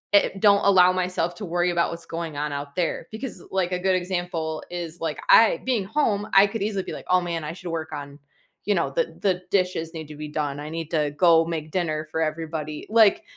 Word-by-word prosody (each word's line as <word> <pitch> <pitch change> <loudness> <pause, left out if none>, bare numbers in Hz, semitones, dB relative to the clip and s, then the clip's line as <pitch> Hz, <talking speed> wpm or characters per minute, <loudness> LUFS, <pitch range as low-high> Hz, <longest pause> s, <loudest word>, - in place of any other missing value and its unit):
i 200 - +5
don't 200 -1 +5
allow 185 -1 +6
myself 180 -2 -1
to 205 - -6
worry 175 0 +1
about 170 0 +1
what's 170 0 -8
going 165 -3 -4
on 150 +1 -2
out 140 0 -6
there, 170 -2 -1
because, 220 -4 -7
like, 185 -1 0
a 180 - 0
good 190 - +4
example 175 -3 -3
is, 175 -1 -6
like, 160 -2 -3
I 225 - +7
being 245 -6 +1
home, 210 -4 0
I 195 +1 +7
could 200 0 -4
easily 200 -3 -1
be, - - -6
like, - - -8
"Oh, 185 0 +5
man, 170 -2 -3
I 150 +1 -4
should 175 -1 -7
work 160 -1 -4
on" 145 -1 -7 0.5
you 205 - +2
know, - - 0
"The - - -1
the 185 -3 +1
dishes 180 -4 0
need 160 -2 -7
to 150 - -9
be 150 +1 -6
done, 145 -2 -2
I 150 +1 -6
need 165 -1 -5
to 150 -3 +1
go 165 -2 +6
make 160 -2 -4
dinner 155 -4 -1
for 160 - -1
everybody," 155 -1 -3
like 225 - +5
170 Hz, 230 wpm, -24 LUFS, 155-190 Hz, 0.5 s, I